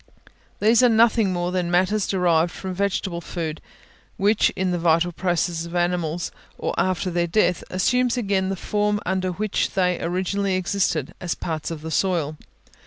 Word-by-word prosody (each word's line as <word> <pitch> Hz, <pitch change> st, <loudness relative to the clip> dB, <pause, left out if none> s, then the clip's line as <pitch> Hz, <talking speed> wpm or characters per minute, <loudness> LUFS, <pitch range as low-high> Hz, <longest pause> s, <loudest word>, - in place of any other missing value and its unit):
These 225 Hz, +4 st, +5 dB
are 250 Hz, -, +6 dB
nothing 225 Hz, -2 st, +4 dB
more 175 Hz, 0 st, -1 dB
than 180 Hz, -2 st, -1 dB
matters 185 Hz, +4 st, +2 dB
derived 175 Hz, -3 st, +2 dB
from 190 Hz, 0 st, -6 dB
vegetable 190 Hz, -2 st, -1 dB
food, 160 Hz, -2 st, -5 dB, 0.6 s
which 205 Hz, +2 st, +3 dB
in 185 Hz, 0 st, 0 dB
the 175 Hz, -, -1 dB
vital 165 Hz, +1 st, +2 dB
processes 170 Hz, -1 st, -1 dB
of 170 Hz, -, -8 dB
animals, 175 Hz, -1 st, -1 dB, 0.3 s
or -, -, -2 dB
after 185 Hz, 0 st, 0 dB
their 170 Hz, 0 st, 0 dB
death, 180 Hz, 0 st, +1 dB
assume 250 Hz, +7 st, +2 dB
again 195 Hz, -4 st, 0 dB
the 195 Hz, -, -1 dB
form 210 Hz, +2 st, 0 dB
under 185 Hz, 0 st, 0 dB
which 205 Hz, +3 st, -1 dB
they 180 Hz, -2 st, +1 dB
originally 190 Hz, +3 st, -1 dB
existed, 185 Hz, -6 st, -1 dB
as 180 Hz, -2 st, -2 dB
parts 160 Hz, -2 st, -4 dB
of 165 Hz, -2 st, -6 dB
the 160 Hz, -, -5 dB
soil. 165 Hz, -5 st, 0 dB
185 Hz, 165 wpm, -23 LUFS, 170-200 Hz, 0.6 s, are